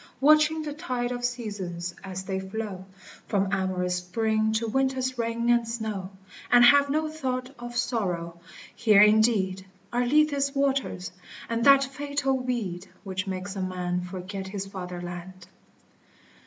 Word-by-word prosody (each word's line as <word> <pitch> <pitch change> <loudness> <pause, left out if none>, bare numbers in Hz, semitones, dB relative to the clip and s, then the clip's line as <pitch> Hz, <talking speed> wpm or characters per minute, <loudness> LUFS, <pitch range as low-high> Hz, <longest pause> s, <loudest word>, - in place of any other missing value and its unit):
Watching 305 +2 +5
the 295 -1 -4
tide 250 -6 -3
of 245 0 -4
seasons 200 -8 -3
as 190 0 -5
they 190 0 -3
flow 190 -1 -5 0.4
From 195 -2 +1
amorous 185 -2 0
Spring 220 +4 0
to 225 +1 0
Winter's 260 +1 0
rain 230 0 -1
and 235 -1 +3
snow, 220 -5 -4 0.4
And 240 0 +8
have 285 +2 +6
no 310 +2 +1
thought 260 -4 -3
of 240 0 -6
sorrow; 180 -9 -2 0.2
— - - -16
here, 210 -2 +8
indeed, 210 -3 +3 0.3
Are 245 +1 +2
Lethe's 285 0 +2
waters, 275 -9 0 0.4
and 230 0 -1
that 275 -1 +8
fatal 280 0 -1
weed 225 -8 -3 0.2
Which 190 0 -4
makes 190 +1 -4
a 195 - -3
man 180 -1 -2
forget 185 +2 -6
his 195 0 -4
fatherland. 180 -1 -7
220 Hz, 140 wpm, -27 LUFS, 185-255 Hz, 0.4 s, And